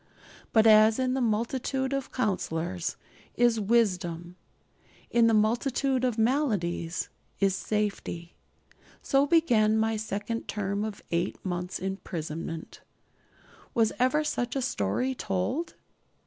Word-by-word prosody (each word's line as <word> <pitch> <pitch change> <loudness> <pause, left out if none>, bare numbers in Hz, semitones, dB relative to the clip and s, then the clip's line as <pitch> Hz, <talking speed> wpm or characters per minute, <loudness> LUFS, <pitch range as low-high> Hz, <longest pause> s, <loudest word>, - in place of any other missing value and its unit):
But 220 -1 +5
as 215 0 +7
in 255 -1 +1
the 265 - 0
multitude 255 +4 -1
of 275 -1 -3
counsellors 180 -6 -2 0.4
is 240 -2 +3
wisdom, 180 -6 0 0.8
in 235 -1 +5
the 225 - +3
multitude 250 +4 +1
of 245 -3 +1
maladies 210 - 0 0.3
is 195 -1 +3
safety. 200 -5 -3 0.7
So 275 +1 +3
began 230 -10 +4
my 220 0 +1
second 215 +2 -4
term 200 -1 -2
of 215 -2 -5
eight 170 +2 0
months' 180 0 -3
imprisonment. 165 -4 -5 0.9
Was 225 -2 +3
ever 260 +5 +3
such 245 -4 -2
a 270 - 0
story 245 - 0
told? 240 - -2
220 Hz, 115 wpm, -28 LUFS, 185-250 Hz, 0.9 s, as